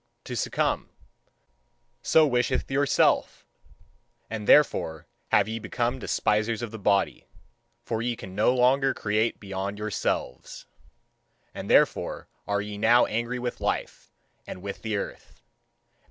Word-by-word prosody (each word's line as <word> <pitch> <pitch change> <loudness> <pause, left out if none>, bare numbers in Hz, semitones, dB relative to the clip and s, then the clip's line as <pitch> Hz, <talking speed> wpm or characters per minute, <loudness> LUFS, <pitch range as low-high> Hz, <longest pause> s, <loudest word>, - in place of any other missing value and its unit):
To - - -6
succumb - - -1 1.1
so 160 -1 +5
wisheth 125 -1 0
your 140 +1 +2
Self; - - +2 0.9
and 110 -2 -5
therefore 80 - +3 0.2
have 100 - +3
ye 110 +1 -4
become 120 +3 -2
despisers 110 0 0
of 115 - -5
the 110 - -8
body. 100 -1 +1 0.6
For 110 -1 -3
ye 120 0 -1
can 95 -4 -10
no 105 +5 +3
longer 130 +2 +3
create 110 +2 0
beyond 100 0 -5
yourselves. 105 0 -3 0.9
And - - -7
therefore - - +2 0.2
are 100 0 0
ye 105 0 -7
now 115 +3 +5
angry 120 +3 -2
with 120 0 -4
life - - -3 0.4
and 90 - -8
with 100 0 -6
the 110 -2 -2
earth. - - -8
110 Hz, 130 wpm, -26 LUFS, 105-125 Hz, 1.1 s, so